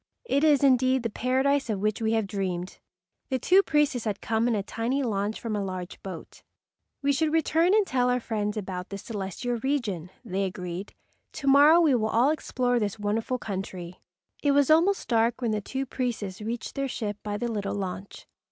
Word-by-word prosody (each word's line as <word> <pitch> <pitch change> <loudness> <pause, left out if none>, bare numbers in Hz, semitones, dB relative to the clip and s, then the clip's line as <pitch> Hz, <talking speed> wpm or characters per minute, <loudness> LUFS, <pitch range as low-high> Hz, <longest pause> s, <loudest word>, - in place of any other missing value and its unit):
"It 280 -8 +1
is 295 -3 +4
indeed 260 -1 +4
the 230 - -2
Paradise 265 +3 +1
of 210 -3 -1
which 215 +2 -1
we 220 0 +1
have 220 -2 +1
dreamed." 185 -2 -4 0.5
The 260 - +1
two 365 +10 +5
priests 295 - +1
had 205 -2 -2
come 225 +1 0
in 235 - +2
a 200 - -1
tiny 240 +7 -1
launch 210 -2 -1
from 225 -2 -3
a 205 - -1
large 185 -2 -6
boat. 185 -4 -9 0.6
"We 280 0 +3
should 310 +2 +1
return 325 +4 +3
and 430 -2 +4
tell 250 -6 +1
our 250 0 +2
friends 215 -2 -2
about 185 -2 -5
this 200 -1 -7
celestial 225 +3 -3
region," 220 - -1 0.2
they 195 +1 -1
agreed. 180 +1 -6 0.4
"To 275 - -6
morrow 290 +4 +7
we 315 -5 +4
will 220 -3 +1
all 245 +7 +3
explore 250 -5 0
this 210 -2 -2
wonderful 220 +4 -1
country." 185 -5 -6 0.4
It 285 -1 +3
was 285 +1 +4
almost 350 +5 +3
dark 230 0 +2
when 235 -3 0
the 215 -1 -1
two 265 +6 -3
priests 225 -7 -3
reached 230 +2 -4
their 275 0 -2
ship 210 -5 -4
by 205 -1 -3
the 240 - -2
little 205 -2 -2
launch. 190 0 -6
230 Hz, 195 wpm, -27 LUFS, 200-270 Hz, 0.6 s, morrow